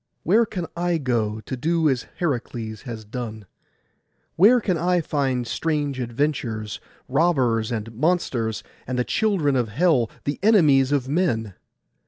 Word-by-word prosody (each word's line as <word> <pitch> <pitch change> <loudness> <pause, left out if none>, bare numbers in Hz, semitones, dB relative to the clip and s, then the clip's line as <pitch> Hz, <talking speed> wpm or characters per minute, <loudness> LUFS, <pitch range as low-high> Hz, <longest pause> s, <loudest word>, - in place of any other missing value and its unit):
Where 220 +7 +4
can 180 -5 -4
I 175 0 0
go, 115 -6 -1
to 130 - -5
do 160 +5 +1
as 130 -4 0
Heracles 120 -8 -3
has 110 -2 -6
done? 110 -1 -6 0.9
Where 220 +8 +6
can 190 -5 0
I 180 +2 +1
find 135 -6 -1
strange 145 +1 -1
adventures, 120 -4 -2 0.3
robbers, 130 -7 +2
and 115 0 -4
monsters, 120 - 0 0.2
and 130 0 -2
the 125 - +2
children 180 - +1
of 120 -3 0
hell, 130 - +2
the 145 - -3
enemies 150 -11 +5
of 140 -3 +1
men? 135 - 0
135 Hz, 140 wpm, -23 LUFS, 115-170 Hz, 0.9 s, Where